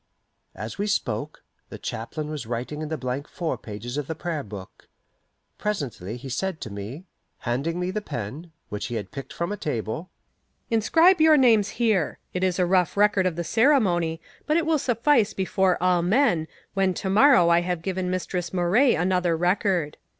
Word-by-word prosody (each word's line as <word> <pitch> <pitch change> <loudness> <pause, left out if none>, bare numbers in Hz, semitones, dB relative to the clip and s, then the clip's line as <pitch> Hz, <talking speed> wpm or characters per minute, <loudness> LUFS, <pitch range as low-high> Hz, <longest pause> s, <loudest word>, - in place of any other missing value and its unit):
As 110 - -7
we 205 - 0
spoke, 140 - -2 0.3
the - - -8
chaplain 150 +7 -5
was 145 -7 -5
writing 125 +6 -4
in 155 - -4
the 160 - -2
blank 130 +2 -4
fore 170 -2 -3
pages 115 +5 -7
of 145 -2 -3
the 160 - -3
Prayer 165 -2 -3
Book. 100 -6 -11 0.7
Presently 125 - -3
he 130 - -9
said 170 +6 -2
to 110 - -6
me, 105 - -7 0.4
handing 140 +9 -2
me 180 +1 -1
the 215 - -2
pen, 140 - -6 0.2
which 105 - -4
he 120 - -4
had 105 -3 -5
picked 135 - -8
from 170 +3 -3
a 205 - -3
table, 150 - -3 0.6
"Inscribe 325 - +4
your 315 -1 +7
names 225 -6 +4
here. 215 -9 0 0.2
It 180 - -2
is 185 -2 +1
a 180 - +3
rough 180 +1 +2
record 205 -2 +4
of 175 - -2
the 170 - -2
ceremony, 175 - +2 0.3
but 305 +1 +3
it 335 - +1
will 320 -2 +2
suffice 240 -2 +2
before 190 -1 +1
all 180 -1 +3
men, 175 - +2 0.3
when 190 -2 +1
to 190 - -4
morrow 220 -4 +6
I 170 0 +5
have 175 -2 -3
given 185 -1 -2
Mistress 180 -2 -3
Moray 185 +9 +3
another 180 -1 +1
record." 180 -3 +1
175 Hz, 180 wpm, -25 LUFS, 145-205 Hz, 0.7 s, your